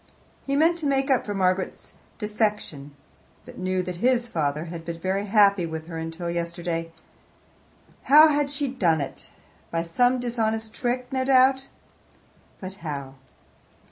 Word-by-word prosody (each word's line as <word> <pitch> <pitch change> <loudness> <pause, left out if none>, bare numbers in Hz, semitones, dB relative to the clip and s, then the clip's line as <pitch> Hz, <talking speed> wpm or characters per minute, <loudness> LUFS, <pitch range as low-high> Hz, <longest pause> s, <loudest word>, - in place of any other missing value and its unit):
He 275 - 0
meant 330 +4 +3
to 305 - -2
make 270 0 +1
up 255 - +2
for 205 - -3
Margaret's 185 0 -1 0.2
defection, 210 -10 -2 0.5
but - - -11
knew 185 0 -1
that 180 -1 -5
his 240 +3 +2
father 150 -5 -1
had 170 -1 -7
been 165 0 -5
very 195 +3 -1
happy 200 -4 +4
with 160 -1 -6
her 165 -1 -6
until 165 +2 -5
yesterday. 170 -1 -3 1.1
How 305 +4 +8
had 290 -1 +1
she 285 0 -2
done 180 -12 +1
it? 140 - -6 0.4
By 165 0 -1
some 245 +10 +2
dishonest 225 -2 -2
trick, 250 +1 -2
no 260 -1 +1
doubt 265 0 +4 0.9
but 185 0 -7
how? 140 -4 -5
200 Hz, 145 wpm, -25 LUFS, 170-255 Hz, 1.1 s, How